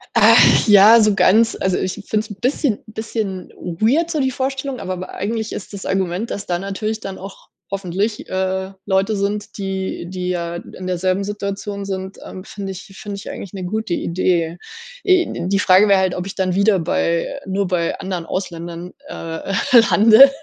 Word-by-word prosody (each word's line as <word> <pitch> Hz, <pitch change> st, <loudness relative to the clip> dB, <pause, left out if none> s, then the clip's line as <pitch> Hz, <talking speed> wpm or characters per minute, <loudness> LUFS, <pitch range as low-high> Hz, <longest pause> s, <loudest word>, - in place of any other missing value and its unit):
Ach -, -, +6 dB
ja, 210 Hz, +2 st, +8 dB
so 210 Hz, -2 st, +3 dB
ganz 225 Hz, +4 st, +4 dB
also, 190 Hz, -1 st, +1 dB
ich 185 Hz, -1 st, -1 dB
finde 215 Hz, -, -1 dB
es -, -, -14 dB
'n 205 Hz, -, -7 dB
bisschen 255 Hz, -3 st, +1 dB
bisschen 215 Hz, -4 st, -4 dB
weird 230 Hz, -, 0 dB
so 315 Hz, -, -1 dB
die 265 Hz, -1 st, +1 dB
Vorstellung, 270 Hz, 0 st, -3 dB
aber 185 Hz, -, -3 dB
aber 185 Hz, 0 st, -7 dB
eigentlich 220 Hz, +3 st, -3 dB
ist 190 Hz, -, -7 dB
das 200 Hz, -2 st, -8 dB
Argument, 190 Hz, +3 st, -1 dB
dass 200 Hz, -, -4 dB
da 175 Hz, -1 st, -1 dB
natürlich 215 Hz, +3 st, -3 dB
dann 195 Hz, -2 st, -7 dB
auch, 195 Hz, +1 st, -11 dB, 0.3 s
hoffentlich, 195 Hz, +3 st, -2 dB
äh, 190 Hz, 0 st, -2 dB
Leute 195 Hz, +2 st, +1 dB
sind, 205 Hz, +1 st, -3 dB
die 190 Hz, -3 st, -3 dB
die 180 Hz, -1 st, -4 dB
ja 170 Hz, -1 st, -2 dB
in 185 Hz, +1 st, -10 dB
derselben 185 Hz, +2 st, 0 dB
Situation 200 Hz, 0 st, -4 dB
sind, 190 Hz, 0 st, -5 dB
ähm, 185 Hz, -, -8 dB
finde 195 Hz, -1 st, -6 dB
ich 185 Hz, -, -8 dB, 0.2 s
finde 205 Hz, -1 st, -5 dB
ich 200 Hz, -, -8 dB
eigentlich 195 Hz, -, -8 dB
'ne 190 Hz, -2 st, -5 dB
gute 215 Hz, +2 st, -2 dB
Idee. 170 Hz, -1 st, 0 dB, 0.5 s
Äh, 365 Hz, -, +2 dB
die 200 Hz, +1 st, +1 dB
Frage 195 Hz, +1 st, +5 dB
wäre 200 Hz, -1 st, +5 dB
halt, 185 Hz, -1 st, +1 dB
ob 180 Hz, -, -4 dB
ich 195 Hz, -, -7 dB
dann 185 Hz, -2 st, 0 dB
wieder 200 Hz, 0 st, +3 dB
bei 170 Hz, +8 st, -1 dB
nur 195 Hz, 0 st, -1 dB
bei 175 Hz, -2 st, -1 dB
anderen 180 Hz, -3 st, -4 dB
Ausländern, 175 Hz, -1 st, -5 dB, 0.2 s
äh, 165 Hz, -, -5 dB, 0.4 s
lande. 220 Hz, +6 st, +8 dB
195 Hz, 180 wpm, -20 LUFS, 185-215 Hz, 0.5 s, ja